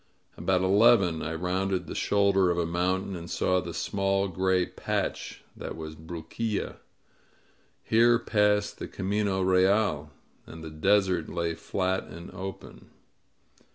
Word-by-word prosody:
About 95 -1 +1
eleven 100 -4 +4
I 80 +1 -3
rounded 90 +2 -1
the - - -7
shoulder 100 -2 +2
of 85 - 0
a 85 - +1
mountain 95 +3 -1
and 85 0 -8
saw 90 0 +1
the 85 - -6
small 95 +3 0
gray 95 0 +1
patch - - -4
that - - -7
was 80 -1 -7
Bruquilla. 85 +7 -4 1.1
Here 120 +1 +4
passed 105 -3 +1
the - - -5
Camino 100 0 -1
Real, 95 -4 +2 0.4
and 80 0 -10
the 80 - -7
desert 95 +1 +2
lay 85 -1 -2
flat 95 +3 -2
and 85 +1 -10
open. 95 0 -9
95 Hz, 130 wpm, -27 LUFS, 85-100 Hz, 1.1 s, eleven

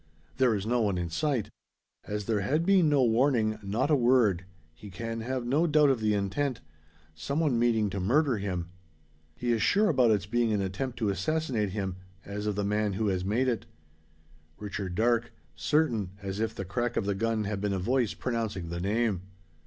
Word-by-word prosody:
There 125 -4 +3
is 100 -1 -3
no 120 +2 +1
one 100 -4 +1
in 85 -1 -3
sight! 130 - -1 0.5
As 105 -1 -4
there 110 -1 +1
has 140 +11 +1
been 180 -2 +4
no 145 -3 +4
warning 115 -2 +2
not 110 +9 -1
a - - +6
word 120 -8 +3 0.3
he 105 +6 -12
can 115 +4 -5
have 125 +1 -3
no 145 +8 +2
doubt 150 -2 +5
of 130 - 0
the 105 -1 +1
intent: 110 +7 -1 0.5
some 140 - -3
one 145 -8 +2
meaning 115 -3 +2
to 100 - -3
murder 130 - +2
him! 90 -3 -3 0.6
He 120 -1 -1
is 115 -2 +1
sure 210 +1 +3
about 125 -3 +4
its 105 -5 +2
being 115 +3 +1
an 105 - +1
attempt 100 +7 -3
to 110 -4 0
assassinate 115 - -1
him, 95 -2 -3 0.3
as 105 +1 -4
of 105 - 0
the 100 0 -1
man 105 0 0
who 105 +2 0
has 90 -1 -1
made 115 +7 +1
it. 120 -3 -1 0.9
Richard 100 -3 -5
Darke 115 +2 +1 0.2
certain, 120 - +1
as 100 0 -5
if 110 0 -1
the 95 - -5
crack 120 +6 -2
of 100 - 0
the 100 - +1
gun 110 +2 0
had 100 -1 -3
been 105 -1 0
a 95 - 0
voice 120 +4 0
pronouncing 110 -8 -3
the 85 +1 -4
name. 105 -1 0
110 Hz, 200 wpm, -29 LUFS, 100-125 Hz, 0.9 s, a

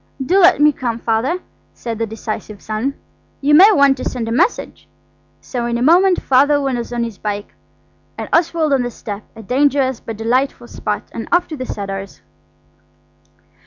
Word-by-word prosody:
"Do 375 +8 +3
let 365 -3 +6
me 300 0 +6
come, 240 -5 -3
Father," 235 +10 -1 0.3
said 230 -2 -5
the 225 - -1
decisive 215 -1 -6
son. 220 +8 -3 0.4
"You 290 +1 +2
may 380 +8 +8
want 280 -7 +4
to - - -6
send 240 -3 -3
a - - -3
message." 350 - -1 0.5
So 240 -2 -4
in 235 0 -1
a 240 - -1
moment 360 +5 +5
Father 285 +3 +4
was 255 -4 -2
on 240 -1 -1
his 230 -4 -6
bike 205 -1 -4 0.6
and - - -5
Oswald 330 -3 +2
on 270 - +3
the 245 - -2
step–a 220 -1 -9
dangerous 265 +1 +1
but 225 -2 -7
delightful 240 +3 0
spot–and 215 +1 -5
off 350 +1 +3
to 315 - -5
the 255 -3 -6
Cedars. 195 -1 -6
255 Hz, 165 wpm, -18 LUFS, 225-290 Hz, 0.6 s, may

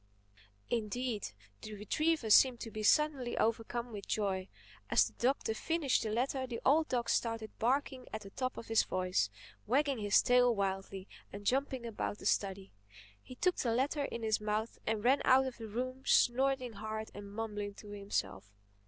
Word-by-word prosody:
Indeed 230 0 -2 0.3
the 215 - -7
retriever 240 +4 0
seemed 250 +1 +6
to 225 - -6
be 215 - -5
suddenly 275 +1 +2
overcome 230 +2 -1
with 205 -2 -7
joy. 195 -3 -1 0.4
As - - +5
the - - -8
Doctor 250 -2 0
finished 305 +3 0
the 220 - -2
letter 260 +4 -1
the 235 -2 -5
old 310 +4 +4
dog 240 -2 0
started 225 -2 -1
barking 260 +1 0
at 220 - -5
the 195 -1 -11
top 255 +3 -3
of - - -7
his 225 -1 +3
voice, 185 - 0 0.4
wagging 275 +2 +2
his 205 -1 +4
tail 245 -1 +4
wildly 195 -1 -3 0.2
and 200 +1 -9
jumping 265 0 0
about 215 -2 -3
the - - -11
study. 195 -1 0 0.5
He 255 - -11
took 360 +7 +1
the 230 -2 0
letter 280 +3 0
in 235 - -5
his 220 -1 +1
mouth 215 +2 -2
and 215 -1 0
ran 265 +3 +4
out 265 +1 +5
of 260 -2 -5
the 225 - -7
room 255 +4 -4
snorting 255 0 +3
hard 220 +1 -5
and 200 0 -9
mumbling 205 -2 -4
to 210 - -12
himself. 200 - -3
230 Hz, 175 wpm, -33 LUFS, 210-260 Hz, 0.5 s, seemed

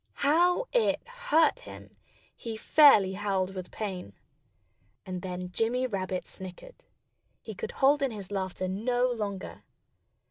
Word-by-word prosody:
How 350 - +3
it - - +2
hurt 485 -6 +2
him! - - -12 0.4
He 225 -2 -6
fairly 220 -8 +6
howled 195 -1 -1
with 185 -1 -7
pain. 185 - -5 0.9
And 185 -1 -5
then 180 0 -5
Jimmy 235 +6 0
Rabbit 190 -5 -3
snickered. 345 - -11 0.6
He - - -7
could 455 - -6
hold 280 +2 +3
in 275 - +2
his 205 -4 -8
laughter 185 -1 -3
no 245 +6 0
longer. 205 -5 -5
215 Hz, 130 wpm, -28 LUFS, 185-285 Hz, 0.9 s, fairly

